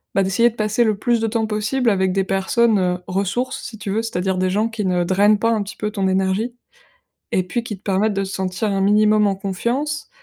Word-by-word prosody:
bah, 195 - +3
d'essayer 215 +6 +3
de 225 - -14
passer 215 +2 +1
le 215 -3 +1
plus 235 +2 +1
de 225 - 0
temps 225 0 0
possible 220 +3 0
avec 190 -2 +1
des 195 0 +1
personnes, 205 +3 +2
heu, 180 -1 0
ressources, 200 +7 -2
si 220 - -8
tu 205 -2 -5
veux, 215 +3 0
c'est-à-dire 190 -4 -2
des 185 0 +1
gens 210 +4 +1
qui 225 -2 -4
ne 180 -1 +1
drainent 200 +4 +3
pas, 230 +2 +1
un 220 -2 +1
petit 200 +1 -7
peu, 210 0 -3
ton 195 -3 -1
énergie 190 +5 0 0.8
et 185 - +2
puis, 235 +6 -2
qui 210 -4 -6
te - - -37
permettent 205 +2 +1
de 195 - -1
te - - -6
sentir 190 +2 -2
un 195 -1 0
minimum 210 +1 +4
en 195 - 0
confiance 240 +10 -2
210 Hz, 240 wpm, -20 LUFS, 190-225 Hz, 0.8 s, minimum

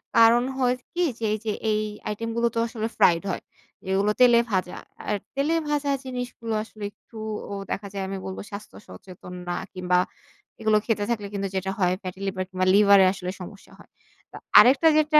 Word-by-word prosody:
কারণ 230 +1 +6
হয় 250 -1 +2 0.2
কি 355 - -1 0.2
যে, 225 - -2
এই 215 - 0
যে, 215 - 0 0.2
এই 215 0 +1 0.3
আইটেম 230 +2 -3
গুলো 235 0 +2
তো 230 - +1
আসলে 225 -1 -3
ফ্রাইড 170 +1 +4
হয়। - - -4 0.5
এগুলো 195 +2 +2
তেলে 240 -2 +7
ভাজা। 185 -2 -1 0.3
আর 210 - +1 0.2
তেলে 285 +4 +1 0.2
ভাজা 290 -1 0 0.2
জিনিসগুলো 245 -3 -5
আসলে 215 -1 -12
একটু 225 - -17 0.3
ও - - -3 0.2
দেখা 200 0 -3
যায় 195 -1 -3
আমি 195 0 -4
বলব 190 - -5
স্বাস্থ্য 200 +1 -9
সচেতন 180 -1 -11
না 175 - -1 0.2
কিংবা 180 -1 +1 0.6
এগুলো 220 -1 +3
খেতে 215 -3 0
থাকলে 210 -4 -1
কিন্তু 200 -1 -2
যেটা 190 0 -1
হয় 180 -1 +3
ফ্যাটি 185 0 -7
লিভার 185 -1 -2
কিংবা 185 0 -1
লিভারে 200 -1 +7
আসলে 180 -1 -5
সমস্যা 195 +3 -11
হয়। - - -17 0.4
তো - - -13 0.2
আরেকটা 275 +6 +7
যেটা 305 0 +5
210 Hz, 185 wpm, -25 LUFS, 190-235 Hz, 0.6 s, তেলে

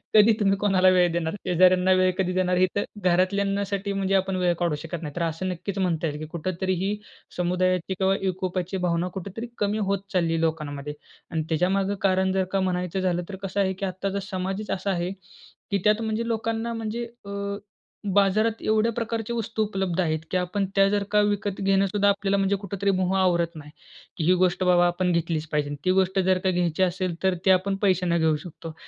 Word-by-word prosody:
कधी 215 +1 +7
तुम्ही 195 -2 +2
कोणाला 195 -2 +4
वेळ 180 -2 +4
देणार? 165 -1 -1
शेजाऱ्यांना 185 +1 +4
वेळ 185 0 +3
कधी 185 -1 0
देणार, 180 -1 +1
हे 185 +1 +4
तर 205 - +1 0.2
घरातल्यांसाठी 200 +2 +1
म्हणजे 195 0 0
आपण 190 0 +1
वेळ 180 -1 +2
काढू 170 -3 +1
शकत 165 0 -5
नाही. 150 -2 -6
तर 175 - -3
असं 165 +3 -2
नक्कीच 185 +3 -4
म्हणता 170 -3 0
येईल 150 -1 -4
की 155 - -5
कुठेतरी 185 +3 -2
ही 200 +2 0 0.4
समुदायाची 180 +1 0
किंवा 190 0 +3
एकोप्याची 185 -1 -2
भावना 170 +1 0
कुठेतरी 200 +5 -6
कमी 205 +1 0
होत 200 -1 +1
चाललीय 165 -3 +1
लोकांमध्ये. 150 -3 -2 0.4
आणि 160 -1 -1
त्याच्यामागे 190 +5 +1
कारण 190 -1 +2
जर 190 0 +2
का 195 - +2
म्हणायचं 180 0 -1
झालं, 180 -1 0
तर 195 - -5
कसं 195 +1 -2
आहे 190 -1 +1
की 190 +1 -4
आत्ताचा 195 +1 -3
समाजच 190 +2 -3
असा 195 +1 -1
आहे 175 0 -1 0.6
की 200 - +3
त्यात 210 +1 +3
म्हणजे 220 +1 -2
लोकांना 230 0 -2
म्हणजे 225 +1 -3 0.2
अ, - - -8 0.8
बाजारात 215 +3 +2
एवढ्या 220 +1 +2
प्रकारच्या 230 0 -3
वस्तू 225 -1 -1
उपलब्ध 190 -4 -2
आहेत 160 -2 0
की 185 - +2
आपण 180 +2 -1
त्या 195 0 +5
जर 205 0 +1
का 210 0 +4
विकत 205 -1 -1
घेणं 195 0 +3
सुद्धा 205 +1 +2
आपल्याला 200 0 +1
म्हणजे 195 0 +2
कुठेतरी 200 0 -1
मोह 185 0 0
आवरत 170 -2 +1
नाही, 150 -1 -10 0.5
की 165 - -2
ही 180 - +5
गोष्ट 185 0 +2
बाबा 175 -1 +5
आपण 180 +1 0
घेतलीच 165 -2 -1
पाहिजे. 150 -1 0 0.2
ती 185 - +4
गोष्ट 190 0 +2
जर 185 0 +3
का 190 - +2
घ्यायची 175 0 +1
असेल, 180 -1 -1
तर 190 0 +3
ती 190 - +6
आपण 190 +1 +2
पैशाने 180 -3 +2
घेऊ 160 -1 +3
शकतो. 165 -2 -9
185 Hz, 195 wpm, -25 LUFS, 175-200 Hz, 0.8 s, कधी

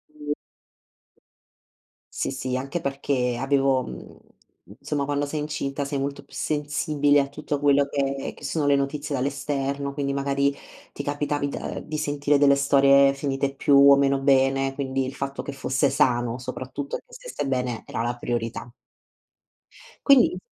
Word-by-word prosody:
Mh. 150 -1 -3 1.8
Sì, - - -1
sì, 130 0 -3
anche 140 +6 -4
perché 135 -3 -1
avevo 135 -1 +2
mhmm, 60 - -10 0.6
insomma, 145 -2 -2
quando 145 0 -1
sei 150 +1 -3
incinta 145 -1 -3
sei 140 0 -2
molto 140 +1 -4
più - - -22
sensibile 145 -1 +1
a 140 - 0
tutto 145 0 -4
quello 140 0 +4
che 140 -1 -2
che - - -16
sono 155 -3 -1
le 145 - +4
notizie 140 +1 -2
dall'esterno, 140 +1 -2
quindi, 140 -1 -2
magari, 140 0 +1 0.4
ti 140 - -6
capitavi 145 0 -1
da - - -5
ehm, - - -6
di 155 0 -4
sentire 145 -1 +1
delle 140 -1 +6
storie 140 0 +5
finite 140 0 -2
più 140 +1 +2 0.2
o - - +9
meno 140 0 +2
bene, 135 0 +2
quindi, 135 -1 -2
il 130 - -5
fatto 135 0 -4
che 140 - -5
fosse 135 0 0
sano, 120 -2 +1
soprattutto 130 +2 -5
e - - -18
che - - -23
stesse - - -6
bene, 125 -3 -2
era - - -4
la 120 +1 -2
priorità. 120 0 -4 1.4
Quindi 280 +5 +5
140 Hz, 160 wpm, -24 LUFS, 135-145 Hz, 1.8 s, o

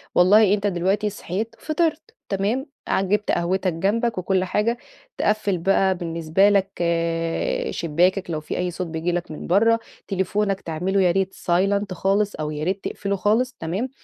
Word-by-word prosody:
والله 200 +3 +6
أنت 205 0 0
دلوقتي 195 +3 0
صحيت 210 +3 -4
فطرت 325 +7 -1
تمام، 210 +7 0 0.2
ع - - +1
جِبت 205 +2 0
قهوتك 185 +1 0
جنبك 210 +6 0
وكُلّ 185 0 +1
حاجة 210 +5 0 0.4
تِقَفِّل 210 -3 +1
بقى 190 +2 +2
بالنسبه 170 +3 +2
لك 195 -1 +2
آآ، 165 -1 -1
شباكَّك 175 +4 +1
لو 155 - -1
في 155 - -5
أي 180 0 -1
صوت 180 0 -4
بييجي 165 +2 -2
لك 175 -2 -3
من 155 - -7
برّا 225 +6 +4 0.3
تليفونك 195 +1 0
تعملُه 180 +5 -1
ياريت 190 +1 +2
silent 195 +2 0
خالص 200 +3 +1
أو 155 -1 -3
ياريت 170 +6 -2
تقفلُه 200 0 -2
خالص، 225 +6 +1
تمام. 190 +11 -2
190 Hz, 155 wpm, -23 LUFS, 175-210 Hz, 0.4 s, والله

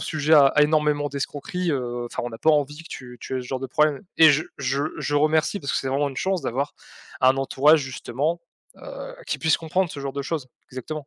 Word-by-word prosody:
sujets 155 0 +1
à 140 -2 +7
énormément 150 -1 +2
d'escroqueries. 145 +5 -3
Heu, 120 -2 -3
enfin 120 - -5
on 120 - -4
a - - -6
pas 160 - +3
envie 145 -1 +1
que - - -14
tu 125 -1 -9
tu 130 - -4
aies - - -3
ce 125 - -9
genre 130 0 -3
de 135 - -3
problème» 150 +4 +1 0.2
et 160 -1 +9
je 150 +2 +2 0.2
je 140 +1 -1 0.2
je 145 - -2
remercie, 155 +6 +2
parce 140 - -3
que - - +1
c'est 135 - -3
vraiment 140 +2 +1
une 130 - -11
chance 190 -2 -1
d'avoir 140 +5 -2 0.5
un 130 +1 +5
entourage, 145 +3 +4
justement, 140 +5 -3 0.4
heu, - - -9
qui - - -2
puisse 160 -1 +3
comprendre 170 +2 -1
ce 145 - -8
genre 140 -1 -4
de 140 - -3
choses, 145 -2 -3 0.2
exactement. 140 +3 -6
145 Hz, 230 wpm, -24 LUFS, 135-155 Hz, 0.5 s, et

